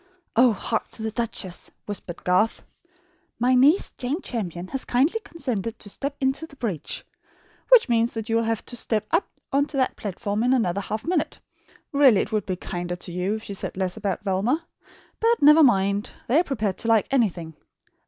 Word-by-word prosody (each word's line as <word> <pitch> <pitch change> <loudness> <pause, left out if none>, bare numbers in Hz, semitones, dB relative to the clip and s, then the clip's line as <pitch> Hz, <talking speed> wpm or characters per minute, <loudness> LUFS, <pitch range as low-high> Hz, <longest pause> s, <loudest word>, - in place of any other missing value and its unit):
"Oh, 245 +1 +6
hark 220 +2 -2
to 220 - -6
the 220 - -2
duchess!" 220 -6 -3 0.2
whispered 190 -4 -6
Garth. 185 +5 +2 0.7
"My 250 +2 +3
NIECE, 280 +9 +4
JANE 275 +8 -2
CHAMPION, 185 -6 -4
HAS 270 - -2
KINDLY 285 - +2
CONSENTED 230 - -4
TO 205 - -8
STEP 280 +5 -3
INTO 270 +4 0
THE 280 - -16
BREACH 205 - -4 0.3
' - - -33
Which - - +7
means 230 -1 +1
that 225 -1 -4
you 225 -1 +2
will 230 - +2
have 225 -1 -1
to 245 - -5
step 220 -2 -1
up 335 +4 +2 0.3
on 285 +1 +3
to 290 - -5
that 260 - +1
platform 205 +1 -3
in 250 +2 +3
another 200 -6 0
half 215 +2 -4
minute. 330 -2 -1 0.5
Really 275 -9 +5
it - - -4
would 215 -1 -1
be 185 - -1
kinder 175 0 -4
to 175 - -7
you 180 +4 -1
if 220 - -7
she 200 - -6
said 190 - -4
less 185 -2 -1
about 205 -2 -3
Velma. 215 - 0 0.5
But 460 +1 +3
never 300 +2 +8
mind; 200 -6 +3 0.2
they 270 +7 +4
are - - +3
prepared 215 - -2
to - - -3
like 225 -2 +4
anything. 180 -11 0
225 Hz, 195 wpm, -24 LUFS, 195-270 Hz, 0.7 s, never